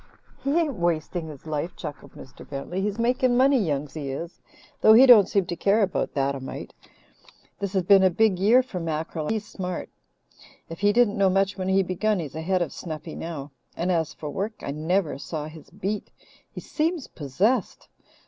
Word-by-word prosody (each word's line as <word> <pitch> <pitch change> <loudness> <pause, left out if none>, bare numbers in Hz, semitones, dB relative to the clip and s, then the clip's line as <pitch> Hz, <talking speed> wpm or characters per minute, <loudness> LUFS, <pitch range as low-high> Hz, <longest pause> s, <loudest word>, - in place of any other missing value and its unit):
"He 280 +4 +1
ain't 300 - 0
wasting 170 0 -1
his 150 -2 -11
life," 155 +2 -3
chuckled 150 -4 -8
Mr. 130 - -13
Bentley. 145 +7 -4
"He's 205 +1 -2
making 245 +1 +2
money, 270 +1 +5
Young 150 -7 -1
Si 140 0 -6
is, 165 +6 -6 0.4
though 220 - +8
he 245 +4 +9
don't 230 -7 +8
seem 195 -3 +1
to 175 - -4
care 205 +4 +3
about 190 - -2
that 140 0 +1
a 135 - -5
mite. 130 - -8 0.9
This 200 -1 -3
has 190 -2 +1
been 195 +2 +6
a 190 - +5
big 195 0 +2
year 230 +7 +5
for 205 -8 -6
mackerel, 160 -1 -3
and - - -1
he's 215 -1 -2
smart. 180 -3 -5 0.8
If 165 - -8
he 205 +1 +4
didn't 220 -2 +3
know 195 -1 +5
much 195 +1 +1
when 185 -1 -4
he 190 0 +3
begun, 200 +4 0
he's 155 -6 -5
ahead 175 +3 0
of 160 - -7
Snuffy 160 -1 -7
now. 150 -4 -6 0.3
And 180 +2 0
as 165 -3 0
for 150 -2 -7
work, 205 +7 -3
I - - -3
never 155 0 -1
saw 150 +1 -5
his 155 0 -12
beat. 205 +2 -4 0.4
He - - -8
seems 320 -1 -1
possessed. 180 - -1
185 Hz, 195 wpm, -25 LUFS, 155-210 Hz, 0.9 s, he